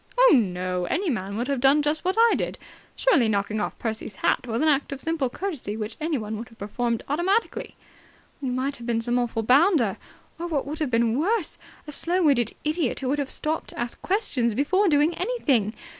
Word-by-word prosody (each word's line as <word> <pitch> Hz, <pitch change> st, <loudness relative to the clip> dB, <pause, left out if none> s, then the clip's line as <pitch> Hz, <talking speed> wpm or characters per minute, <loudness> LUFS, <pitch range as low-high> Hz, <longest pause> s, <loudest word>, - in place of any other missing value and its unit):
"Oh, -, -, +7 dB
no. 180 Hz, -6 st, +1 dB
Any 345 Hz, -, 0 dB
man 200 Hz, -3 st, -3 dB
would 240 Hz, +2 st, -2 dB
have 280 Hz, -2 st, 0 dB
done 275 Hz, +3 st, +4 dB
just 300 Hz, +1 st, 0 dB
what 370 Hz, +1 st, 0 dB
I 465 Hz, 0 st, +6 dB
did. -, -, -3 dB, 0.4 s
Surely, 280 Hz, -, +3 dB
knocking 205 Hz, +1 st, 0 dB
off -, -, -3 dB
Percy's 220 Hz, -3 st, -4 dB
hat 250 Hz, -, 0 dB
was 230 Hz, 0 st, -1 dB
an 315 Hz, -, +2 dB
act 285 Hz, -2 st, +2 dB
of 275 Hz, -, -5 dB
simple 320 Hz, -4 st, -1 dB
courtesy 275 Hz, -, -4 dB
which 215 Hz, 0 st, -5 dB
anyone 225 Hz, -10 st, -2 dB
would 230 Hz, +2 st, -8 dB
have 230 Hz, -, -19 dB
performed 230 Hz, +3 st, -2 dB
automatically!" 370 Hz, +10 st, 0 dB, 0.7 s
"You 265 Hz, -3 st, -2 dB
might 265 Hz, +3 st, -1 dB
have 235 Hz, 0 st, -9 dB
been 230 Hz, -1 st, +1 dB
some 240 Hz, +1 st, +1 dB
awful 230 Hz, -2 st, -1 dB
bounder. 260 Hz, -, +4 dB, 0.4 s
Or, 345 Hz, -, -3 dB
what 300 Hz, -5 st, -1 dB
would 300 Hz, +2 st, -5 dB
have 305 Hz, -4 st, 0 dB
been 230 Hz, -1 st, +2 dB
almost -, -, 0 dB, 0.2 s
worse, 360 Hz, -, -5 dB, 0.3 s
a 300 Hz, -, -7 dB
slow 350 Hz, +5 st, +1 dB
witted 250 Hz, -7 st, +2 dB
idiot 305 Hz, -4 st, -1 dB
who 260 Hz, -, -2 dB
would 290 Hz, +2 st, 0 dB
have 280 Hz, -1 st, -2 dB
stopped 315 Hz, +1 st, -2 dB
to -, -, -9 dB
ask 240 Hz, 0 st, -4 dB
questions 255 Hz, -, 0 dB
before 375 Hz, -, +2 dB
doing 300 Hz, +2 st, +3 dB
anything. 275 Hz, -, +1 dB
270 Hz, 210 wpm, -25 LUFS, 230-315 Hz, 0.7 s, Oh